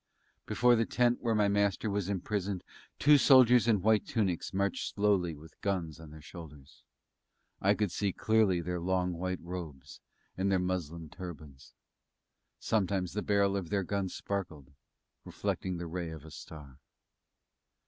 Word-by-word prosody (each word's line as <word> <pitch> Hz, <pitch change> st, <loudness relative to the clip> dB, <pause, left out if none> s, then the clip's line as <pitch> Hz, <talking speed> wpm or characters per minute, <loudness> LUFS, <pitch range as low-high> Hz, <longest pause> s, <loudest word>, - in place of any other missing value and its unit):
Before 125 Hz, 0 st, +4 dB
the 115 Hz, -1 st, +1 dB
tent 120 Hz, -1 st, +2 dB
where 115 Hz, -2 st, +1 dB
my 105 Hz, -1 st, +3 dB
Master 100 Hz, +1 st, +1 dB
was 100 Hz, -2 st, -1 dB
imprisoned 100 Hz, -1 st, -2 dB, 0.3 s
two 145 Hz, 0 st, +6 dB
soldiers 125 Hz, -3 st, +6 dB
in 105 Hz, -5 st, +3 dB
white 110 Hz, 0 st, +4 dB
tunics 95 Hz, -7 st, -1 dB
marched 100 Hz, -1 st, -1 dB
slowly 100 Hz, -5 st, +2 dB
with 75 Hz, +2 st, -16 dB
guns 90 Hz, -6 st, -2 dB
on 80 Hz, -1 st, -11 dB
their 75 Hz, 0 st, -12 dB
shoulders. 75 Hz, -4 st, -12 dB, 0.8 s
I 100 Hz, +2 st, +4 dB
could 105 Hz, -4 st, -1 dB
see 100 Hz, -2 st, -1 dB
clearly 105 Hz, -4 st, +2 dB
their 90 Hz, +1 st, -3 dB
long 90 Hz, 0 st, 0 dB
white 90 Hz, +1 st, -3 dB
robes, 85 Hz, -6 st, -8 dB, 0.4 s
and 95 Hz, +1 st, 0 dB
their 95 Hz, -, +4 dB
muslin 85 Hz, -3 st, -3 dB
turbans. 75 Hz, -7 st, -10 dB, 0.8 s
Sometimes 95 Hz, -4 st, 0 dB
the 105 Hz, -, -2 dB
barrel 100 Hz, -1 st, +2 dB
of 95 Hz, -4 st, -3 dB
their 100 Hz, +1 st, 0 dB
gun 100 Hz, +1 st, -2 dB
sparkled, 85 Hz, -9 st, -5 dB, 0.5 s
reflecting 95 Hz, -2 st, -3 dB
the 85 Hz, -, -5 dB
ray 85 Hz, 0 st, -4 dB
of 80 Hz, -2 st, -9 dB
a 80 Hz, -, -11 dB
star. 70 Hz, -2 st, -11 dB
95 Hz, 150 wpm, -31 LUFS, 85-100 Hz, 0.8 s, two